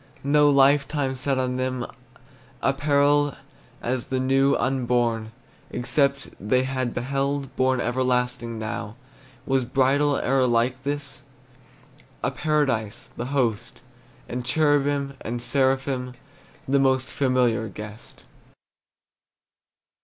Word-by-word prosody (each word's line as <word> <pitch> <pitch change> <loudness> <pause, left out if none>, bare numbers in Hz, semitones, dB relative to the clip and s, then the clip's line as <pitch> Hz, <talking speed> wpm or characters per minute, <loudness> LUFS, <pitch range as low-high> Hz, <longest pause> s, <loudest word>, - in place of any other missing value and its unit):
No 145 +1 +4
lifetime 140 0 +3
set 135 +1 -1
on 130 -1 -1
them, 130 -1 -2 0.8
Apparelled 145 +1 +2 0.5
as 125 0 -2
the 130 - -1
new 135 +1 +3
Unborn, 120 -3 0 0.4
except 140 +3 0
they 125 +6 +1
had 130 -2 -2
beheld, 135 +2 -2
Born 130 0 +2
everlasting 125 -2 -1
now. 105 -1 -5 0.5
Was 135 -1 +1
bridal 140 +3 +2
e'er 130 0 +2
like 120 +2 +1
this? 145 0 -4 1.0
A - - +1
paradise, 130 -7 -1
the 120 - -4
host, 125 -4 -1 0.5
And 125 +1 -4
cherubim 140 0 +1
and 120 +1 -3
seraphim 130 0 0 0.5
The 140 +1 +3
most 130 -1 +2
familiar 125 -4 +1
guest. 105 +2 -10
130 Hz, 100 wpm, -24 LUFS, 120-140 Hz, 1.0 s, No